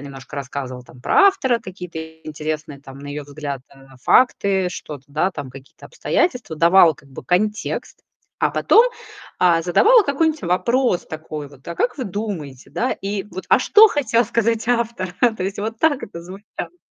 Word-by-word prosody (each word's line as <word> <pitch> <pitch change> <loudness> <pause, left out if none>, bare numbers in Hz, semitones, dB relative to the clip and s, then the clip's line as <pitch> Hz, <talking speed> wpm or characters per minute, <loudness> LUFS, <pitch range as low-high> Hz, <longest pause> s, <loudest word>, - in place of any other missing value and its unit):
немножко 135 -1 -10
рассказывала, 130 -2 -5
там 125 0 -17
про 400 -2 +5
автора, 260 -12 +2
какие-то 180 -3 -8 0.3
интересные 155 -1 -5
там 135 -1 -12
на 145 - -10
её 145 +1 -5
взгляд, 145 -2 -6
а, 135 -1 -18
факты, 195 - +3
что-то, 145 -5 -8
да, 155 +6 0
там, 145 -6 -7
какие-то 135 +1 -14
обстоятельства, 250 - -1
давала 170 0 +6
как 140 - -20
бы 130 - -9
контекст, 210 +4 -1 0.4
а - - +2
потом, 460 - +5 0.5
а, 170 -2 +4
задавала 430 - +5
какой-нибудь 315 0 0
вопрос 210 +4 +1
такой 155 -2 -7
вот: 140 -2 -19
"А 170 - -5
как 250 0 0
вы - - -2
думаете, 180 - -6
да?" 255 - -1
И 200 0 -3
вот: 185 - -7
"А - - +5
что 435 +1 +7
хотел 240 - +1
сказать 230 0 0
автор?" 230 -7 -1 0.2
То 185 - -3
есть 195 +1 -4
вот 220 +2 -4
так 300 -4 +2
это 170 - -8
звучало. 195 - -9
180 Hz, 170 wpm, -21 LUFS, 145-230 Hz, 0.5 s, что